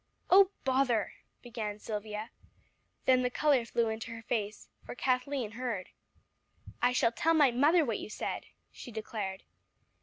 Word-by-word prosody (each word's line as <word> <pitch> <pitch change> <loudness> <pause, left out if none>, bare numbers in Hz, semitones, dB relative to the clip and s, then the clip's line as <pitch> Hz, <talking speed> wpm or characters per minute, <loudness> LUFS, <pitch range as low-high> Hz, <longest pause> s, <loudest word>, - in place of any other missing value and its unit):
"Oh 385 0 +8
bother!" 260 -5 +1 0.3
began 220 -4 -4
Silvia. 210 0 -5 0.7
Then 255 -1 +5
the 250 - +1
color 275 -1 +3
flew 235 -1 +1
into 220 +1 -4
her 230 0 -8
face, 210 -2 -3 0.2
for - - -8
Kathleen 255 -2 0
heard. 230 -5 -4 0.9
"I 245 - +4
shall 235 -2 +3
tell 325 +7 +2
my 290 -5 +5
mother 300 +7 +4
what 230 -4 -1
you - - -7
said," - - -4 0.2
she 245 - -10
declared. 210 -3 -5
235 Hz, 145 wpm, -31 LUFS, 215-260 Hz, 0.9 s, Oh